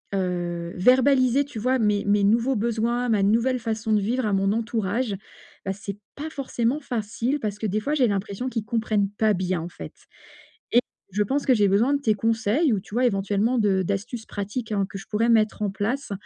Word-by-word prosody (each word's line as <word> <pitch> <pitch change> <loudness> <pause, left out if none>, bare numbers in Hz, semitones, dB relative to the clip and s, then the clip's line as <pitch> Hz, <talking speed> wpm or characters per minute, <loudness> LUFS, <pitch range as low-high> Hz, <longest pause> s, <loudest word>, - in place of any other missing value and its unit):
Heu, 175 -2 -2
verbaliser 255 +4 +4
tu 275 -5 -10
vois? 255 +4 +1
Mes 210 -2 +1
mes 205 0 +3
nouveaux 230 +6 +3
besoins, 235 +2 0
ma 210 -3 +2
nouvelle 230 +5 +2
façon 220 -1 -2
de 210 - +3
vivre 240 +5 -1
à 205 - 0
mon 195 0 +2
entourage, 225 0 -1 0.5
bah, 195 - -1
c'est 200 0 -7 0.2
pas 305 +3 -5
forcément 265 -2 -1
facile 240 +2 -2
parce 210 -4 -3
que 220 - -3
des 210 +2 0
fois 290 +7 -1
j'ai 260 -5 +3
l'impression 200 +3 -2
qu'ils 225 -4 -3
comprennent 215 -3 0
pas 215 +1 +1
bien, 180 -2 -1
en 170 - -6
fait, - - -9 0.8
et 240 - +6 0.3
je 210 +3 +1
pense 275 +7 -1
que 260 - +6
j'ai 205 -2 +3
besoin 225 +8 +3
de 285 - -2
tes 220 -6 +3
conseils 225 - +1
ou 205 - 0
tu 205 - -15
vois, 250 +1 +3
éventuellement, 205 +3 0
de 200 -3 +2
d'astuces 205 +5 -3
pratiques 210 +3 -5
hein, 200 -1 +1
que - - -7
je 195 - -12
pourrais 225 +2 +1
mettre 215 -2 +3
en 205 - 0
place 220 +6 -3
220 Hz, 205 wpm, -24 LUFS, 200-245 Hz, 0.8 s, et